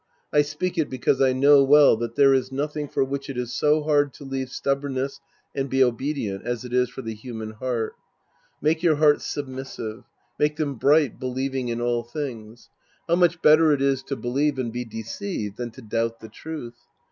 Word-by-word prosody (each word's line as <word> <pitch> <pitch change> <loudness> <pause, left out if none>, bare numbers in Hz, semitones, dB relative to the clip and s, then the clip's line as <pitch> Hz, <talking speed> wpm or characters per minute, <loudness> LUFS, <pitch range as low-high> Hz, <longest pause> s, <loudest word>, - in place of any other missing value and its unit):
I 150 - +6
speak 160 +5 -3
it 155 - +1
because 130 +1 0
I 135 -1 +5
know 140 +2 +6
well 145 0 +6
that 115 0 -4
there 140 -1 +6
is 130 -1 0
nothing 150 +2 -3
for 135 - 0
which 135 +1 -4
it 135 - -5
is 125 -1 -3
so 150 +1 +2
hard 145 -2 +2
to - - -11
leave 135 -1 -4
stubbornness 140 0 -2 0.3
and 135 -1 -2
be 135 0 +4
obedient 125 -5 -2
as 120 0 -3
it 125 - -7
is 125 -1 +2
for 130 +1 -8
the 115 -1 -4
human 110 -1 -7
heart. 115 0 -3 0.7
Make 160 +2 +2
your 170 -3 +4
hearts 150 0 +3
submissive. 130 -5 -6 0.4
Make 150 0 +2
them 150 -3 -2
bright, 140 0 +3
believing 130 0 -2
in 120 0 -2
all 120 0 +1
things. 120 -3 -7 0.4
How 170 - +3
much 175 -1 +2
better 155 +1 +6
it 140 - 0
is 135 -1 +2
to 140 - -3
believe 140 +4 0
and 120 -3 -3
be 125 0 -3
deceived 110 - -5
than 120 -1 -4
to 120 +2 -14
doubt 115 +1 -2
the 110 - -11
truth! 150 -7 -8
135 Hz, 195 wpm, -24 LUFS, 120-145 Hz, 0.7 s, I